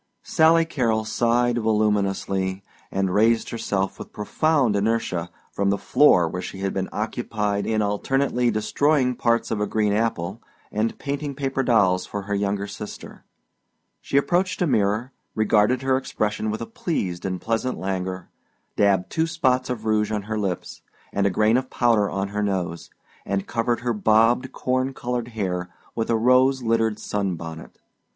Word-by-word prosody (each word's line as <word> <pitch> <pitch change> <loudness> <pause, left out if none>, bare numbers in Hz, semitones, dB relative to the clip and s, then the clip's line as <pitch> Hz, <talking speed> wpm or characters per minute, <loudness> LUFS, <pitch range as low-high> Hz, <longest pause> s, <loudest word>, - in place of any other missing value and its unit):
Sally 165 +1 +4
Carrol 115 -8 0
sighed 120 +2 +1
voluminously 100 -3 0 0.3
and 95 -1 -1
raised 115 +3 +3
herself 100 -4 -2
with - - -9
profound 130 +1 +1
inertia 100 -5 0 0.2
from 100 0 0
the 100 - +2
floor 90 - +4
where 90 +3 -4
she 95 - -7
had 95 0 -1
been 95 -1 -2
occupied 105 -2 -2
in 110 -1 +1
alternately 125 +4 +1
destroyed 125 +4 +1
parts 115 -1 +1
of 105 -2 -1
a 105 - 0
green 105 -2 +1
apple 105 -2 -1 0.3
and 110 +2 -1
painting 140 0 -4
paper 135 -1 -1
dolls 100 -8 +3
for 100 -1 -5
her 100 +1 -3
younger 100 0 -1
sister. 100 +1 -9 0.8
She 140 - -1
approached 180 +6 +1
a - - +3
mirror, 110 -2 +1 0.2
regarded 110 +4 +2
her 130 0 +2
expression 110 -4 -2
with 110 +1 -3
a - - -3
pleased 100 - -3
and 95 -2 -2
pleasant 115 +3 -1
languor, 95 -1 -4 0.4
dabbed 100 -3 +2
two 160 0 +1
spots 130 -7 +1
of 115 -3 -4
rouge 110 -1 +1
on 105 -2 -2
her 110 +1 -3
lips 95 -4 -4 0.3
and 100 0 +2
a - - +3
grain 110 +5 +3
of 130 0 -3
powder 115 -5 +2
on 95 0 -2
her 105 +1 -2
nose, 90 -4 -2 0.3
and 100 0 -2
covered 120 +1 -1
her 120 -1 0
bobbed 115 +4 +3
corn 130 +1 -1
colored 120 -1 -3
hair 90 -3 -2 0.2
with 115 - -2
a 115 - +3
rose 130 +3 +4
littered 115 -2 +1
sunbonnet. 85 -7 -4
110 Hz, 160 wpm, -23 LUFS, 100-125 Hz, 0.8 s, Sally